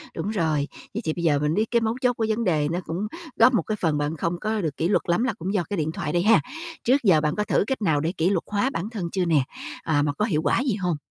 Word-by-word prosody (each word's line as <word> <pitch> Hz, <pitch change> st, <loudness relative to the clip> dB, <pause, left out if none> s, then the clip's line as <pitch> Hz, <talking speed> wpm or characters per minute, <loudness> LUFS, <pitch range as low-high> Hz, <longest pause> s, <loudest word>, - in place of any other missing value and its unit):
đúng 205 Hz, -, -3 dB
rồi. 160 Hz, -8 st, 0 dB, 0.3 s
Vậy 220 Hz, -, -3 dB
thì 155 Hz, -, 0 dB
bây 170 Hz, -, -5 dB
giờ 150 Hz, -4 st, +3 dB
mình 150 Hz, +1 st, 0 dB
biết 215 Hz, +5 st, +2 dB
cái 235 Hz, -1 st, +3 dB
mấu 225 Hz, 0 st, 0 dB
chốt 250 Hz, -1 st, +3 dB
của 230 Hz, -2 st, -1 dB
vấn 220 Hz, +2 st, 0 dB
đề 155 Hz, -7 st, +1 dB
nó 175 Hz, -, -1 dB
cũng 180 Hz, +6 st, -3 dB, 0.3 s
góp 255 Hz, -, +6 dB
một 225 Hz, -, +3 dB
cái 215 Hz, -, -2 dB
phần 160 Hz, -4 st, +1 dB
bạn 145 Hz, +2 st, -2 dB
không 170 Hz, +3 st, -2 dB
có 215 Hz, +1 st, -1 dB
được 155 Hz, -5 st, -3 dB
kỷ 165 Hz, -, +1 dB
luật 195 Hz, -, +2 dB
lắm 175 Hz, +7 st, +2 dB
là 255 Hz, -, 0 dB
cũng 185 Hz, +4 st, -3 dB
do 195 Hz, -4 st, +1 dB
cái 205 Hz, -, -2 dB
điện 155 Hz, -1 st, -1 dB
thoại 165 Hz, -4 st, -3 dB
đây 175 Hz, 0 st, +2 dB
ha. 215 Hz, -4 st, +5 dB, 0.4 s
Trước 255 Hz, +3 st, +4 dB
giờ 180 Hz, -8 st, +5 dB
bạn 150 Hz, 0 st, 0 dB
có 210 Hz, -, 0 dB
thử -, -, +2 dB
cách 265 Hz, -3 st, -2 dB
nào 160 Hz, -7 st, +2 dB
để 160 Hz, +3 st, 0 dB
kỷ 165 Hz, +3 st, +2 dB
luật 190 Hz, -4 st, 0 dB
hóa 210 Hz, +5 st, +1 dB
bản 190 Hz, +6 st, -3 dB
thân 200 Hz, -7 st, -4 dB
chưa 185 Hz, -2 st, 0 dB
nè? 155 Hz, -5 st, +3 dB, 0.4 s
À, 150 Hz, -3 st, +2 dB
mà 145 Hz, 0 st, 0 dB
có 210 Hz, -, 0 dB
hiệu 160 Hz, -9 st, 0 dB
quả 180 Hz, -, +2 dB
gì 255 Hz, -4 st, 0 dB
hông? 180 Hz, -5 st, -1 dB
180 Hz, 310 wpm, -24 LUFS, 160-215 Hz, 0.4 s, góp